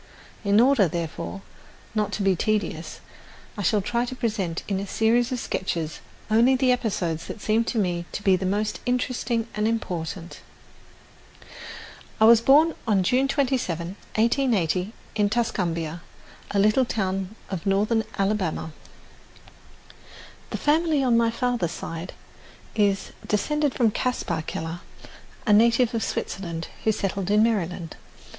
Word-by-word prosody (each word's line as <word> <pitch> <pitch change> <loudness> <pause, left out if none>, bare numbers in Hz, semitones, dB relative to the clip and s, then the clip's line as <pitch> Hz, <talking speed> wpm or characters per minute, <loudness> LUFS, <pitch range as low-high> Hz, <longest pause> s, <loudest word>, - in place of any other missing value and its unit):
In 200 +1 +4
order, 245 -5 +5
therefore, 170 +3 -5 0.5
not 210 -2 0
to 200 - -1
be 195 -1 +3
tedious 215 +3 -2 0.5
I 205 - -4
shall 205 +2 +2
try 235 +4 0
to 255 - -6
present 205 -9 -2
in 195 -2 -1
a 200 - -4
series 235 +5 +2
of 255 - -1
sketches 165 -7 -3 0.3
only 235 +4 +5
the 255 0 +3
episodes 180 -9 -1
that - - -7
seem 220 +2 +2
to 235 - -2
me 175 -4 0
to 205 - -4
be 190 -2 +5
the 185 - -3
most 210 +3 -1
interesting 245 -2 0
and 210 0 0
important. 180 -5 -3 1.8
I 220 - +6
was 230 0 +8
born 300 +6 +5
on 200 -4 +3
June 255 +8 +2
27, 250 - 0 0.3
1880, 215 - +1 0.2
in 210 -2 +2
Tuscumbia, 175 -8 -1 0.5
a 205 - -2
little 215 +6 +4
town 195 -2 -2 0.2
of 185 -1 -4
northern 210 +3 +2
Alabama. 195 -5 -1 1.8
The - - -3
family 305 -1 +2
on 245 -3 +3
my 230 0 +4
father's 230 -7 -1
side 165 +2 -6 0.6
is 200 -3 +1 0.2
descended 295 +7 0
from 230 -4 +3
Caspar 250 -9 -1
Keller, 165 +2 -4 0.7
a 210 - +4
native 235 +2 +4
of 225 -2 -1
Switzerland, 170 -3 -4 0.2
who 220 - +5
settled 195 -2 -2
in 210 +1 +5
Maryland. 180 -7 -1
210 Hz, 135 wpm, -25 LUFS, 185-235 Hz, 1.8 s, was